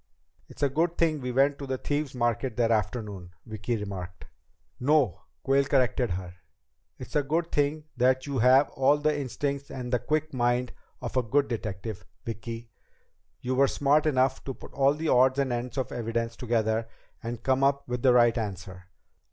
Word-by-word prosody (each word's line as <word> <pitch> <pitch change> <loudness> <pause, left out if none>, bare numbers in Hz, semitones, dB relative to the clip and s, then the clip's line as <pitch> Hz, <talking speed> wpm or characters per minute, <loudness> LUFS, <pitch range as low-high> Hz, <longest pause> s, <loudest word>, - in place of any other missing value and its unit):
"It's - - -8
a 140 - +4
good 165 +5 0
thing 155 -3 +1
we 125 0 -3
went 140 +3 +2
to 140 - -6
the 130 0 -2
Thieves' 145 0 -2
Market 120 0 -1
that 115 -1 +2
afternoon," 105 -5 -2
Vicki 110 +2 -3
remarked. 95 -4 -7 0.5
"No," 135 - +2 0.2
Quayle 135 +1 +3
corrected 130 -3 +2
her. 90 0 -5 0.6
"It's - - -10
a 150 - +4
good 160 +4 -1
thing 150 +1 0
that 130 +1 +3
you 140 -3 -2
have 130 +4 +5
all 135 +2 +3
the 150 0 +1
instincts 140 0 -3
and 125 -1 -5
the 125 - +3
quick 155 +2 -1
mind 120 0 0 0.3
of 120 - -5
a - - +5
good 140 +5 +1
detective, 105 -3 -5 0.2
Vicki. 115 +1 -6 0.7
You 125 - -2
were 135 +2 +4
smart 145 +3 +2
enough 130 -2 +2
to 135 - -4
put - - -13
all 140 +1 +3
the 160 +1 -2
odds 130 +1 +4
and 135 -3 +1
ends 120 +2 -4
of 130 - -2
evidence 115 0 -2
together 115 -2 0 0.3
and 115 0 -6
come 130 0 +2
up 140 0 +2
with 125 -1 -3
the 130 - +5
right 120 -1 +4
answer. 95 -3 -6
125 Hz, 180 wpm, -27 LUFS, 115-140 Hz, 0.7 s, have